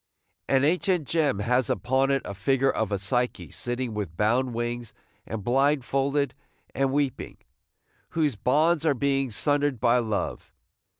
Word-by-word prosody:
An 135 0 +3
ancient 175 0 +1
gem 150 -9 +1
has 125 +3 +1
upon 130 +8 +1
it 135 -1 +1
a - - -5
figure 135 +7 +1
of 110 -2 -2
a 100 - +1
Psyche 120 +6 -2
sitting 120 -1 -3
with 100 -6 -5
bound 120 +5 +2
wings 120 0 -4 0.3
and 110 -1 -5
blindfolded 135 +2 +1 0.4
and 135 -1 +1
weeping, 140 -2 -2 0.7
whose 150 -6 0
bonds 155 - +2
are 155 -4 +2
being 135 0 0
sundered 145 +3 +1
by 120 +1 +3
Love. 110 -4 -3
130 Hz, 140 wpm, -26 LUFS, 115-140 Hz, 0.7 s, An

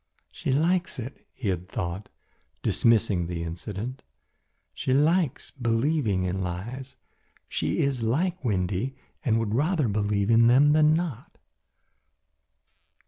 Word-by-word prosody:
"She - - -3
likes 170 +6 +1
it," 125 +2 -8
he 115 -6 -4
had 90 -1 -2
thought, 95 0 -4 0.5
dismissing 110 -7 +2
the 85 -1 -4
incident. 100 +9 -5 0.7
"She 130 - -1
likes 155 0 +1
believing 115 -4 0
in 90 +1 -2
lies. 115 +10 -5 0.5
She - - -1
is 135 -3 0
like 165 +10 0
Windy 100 +3 -1 0.3
and 115 -2 +2
would 115 -2 -1
rather 150 +2 +1
believe 105 0 0
in 115 0 +6
them 135 +5 +6
than 155 0 +5
not." 165 -8 -4
115 Hz, 120 wpm, -26 LUFS, 100-140 Hz, 0.7 s, in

